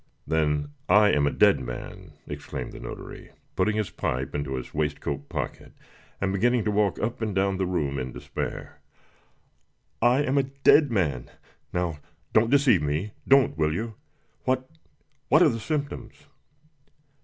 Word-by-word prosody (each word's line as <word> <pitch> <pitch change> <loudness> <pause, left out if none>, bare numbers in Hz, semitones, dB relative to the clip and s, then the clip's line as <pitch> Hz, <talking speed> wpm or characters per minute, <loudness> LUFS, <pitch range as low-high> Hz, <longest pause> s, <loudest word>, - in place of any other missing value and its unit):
"Then 75 -2 0 0.2
I 105 0 +6
am 70 -1 +3
a - - +1
dead - - +4
man!" 60 -1 -8
exclaimed - - -6
the - - -10
notary, - - -8 0.3
putting 105 - +1
his 110 -2 -1
pipe 65 +1 -2
into 70 -2 -2
his 65 - -6
waistcoat 75 -2 -2
pocket, - - -5 0.5
and 95 0 0
beginning 120 +4 +2
to 105 - 0
walk 105 -1 +1
up 115 +2 -3
and 110 -3 -2
down 95 0 +1
the 95 -1 0
room 75 -7 -1
in 65 0 -4
despair. - - -6 1.2
"I 125 +4 +4
am 140 0 +2
a - - +3 0.2
dead 145 -2 +7
man! 75 - -1 0.4
Now 85 -4 -2 0.3
don't 110 +1 +4
deceive 135 - +4
me 75 +8 -1 0.2
don't, 135 - +5
will 75 0 +2
you? 110 +3 -3 0.5
What 130 0 0 0.6
what 155 +4 +6
are 160 - +6
the 115 -3 -3
symptoms?" 145 +4 -4
95 Hz, 155 wpm, -26 LUFS, 75-120 Hz, 1.2 s, dead